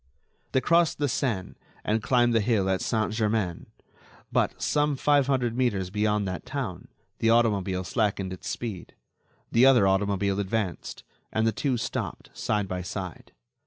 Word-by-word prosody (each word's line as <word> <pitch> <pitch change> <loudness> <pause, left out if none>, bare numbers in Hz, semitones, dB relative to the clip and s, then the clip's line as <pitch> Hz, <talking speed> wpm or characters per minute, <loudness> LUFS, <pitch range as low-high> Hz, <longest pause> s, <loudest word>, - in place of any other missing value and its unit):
They 130 - +3
crossed 170 +1 +3
the 145 - +1
Seine 115 -7 -1 0.3
and 110 +1 0
climbed 120 +1 +3
the 115 - +3
hill 105 -3 +1
at 95 - 0
Saint 110 -1 0
Germain; 105 -5 -1 0.6
but, - - +1
some 150 -1 +1
five 145 0 +3
hundred 125 -4 +1
metres 100 -8 0
beyond 105 -1 +1
that 90 -1 -4
town, - - -5 0.3
the 115 - +2
automobile 100 -5 +2
slackened 95 +1 -1
its 90 - -9
speed. 110 -7 -5 0.6
The 120 +3 +6
other 125 -6 +6
automobile 100 0 +1
advanced, 100 -2 -3 0.3
and 110 0 +1
the 115 - +3
two 130 +1 -1
stopped, - - -4
side 105 -2 -1
by 90 -1 -3
side. 90 -1 -6
110 Hz, 155 wpm, -27 LUFS, 95-120 Hz, 0.6 s, The